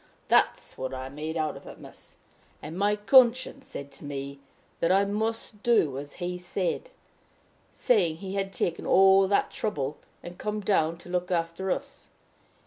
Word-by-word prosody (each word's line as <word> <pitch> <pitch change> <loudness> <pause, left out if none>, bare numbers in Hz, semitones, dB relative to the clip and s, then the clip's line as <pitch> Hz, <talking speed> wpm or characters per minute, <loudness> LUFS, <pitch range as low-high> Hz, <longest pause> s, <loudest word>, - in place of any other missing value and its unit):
That's - - +2
what 130 0 -3
I 130 0 -6
made 155 +4 -5
out 155 -1 -1
of - - -12
it, - - -10
miss. - - -12 0.4
And 160 - -8
my 205 +2 +2
conscience 255 +4 +4
said 140 0 -7
to 135 - -8
me, 140 -1 -6 0.4
that 170 - +2
I 195 +1 +4
must 215 +1 -3
do 170 - +2
as 145 0 -8
he 180 0 -4
said, 180 - -2 0.8
seeing 185 -10 +2
he 190 +3 -7
had 195 -1 -1
taken 170 -3 -2
all 195 +1 +6
that 200 - +1
trouble, 150 -9 -3 0.3
and 175 0 -10
come 210 0 -2
down 165 -5 +1
to 170 - -13
look 180 0 -1
after 170 +2 -1
us. - - -4
180 Hz, 165 wpm, -27 LUFS, 155-205 Hz, 0.8 s, all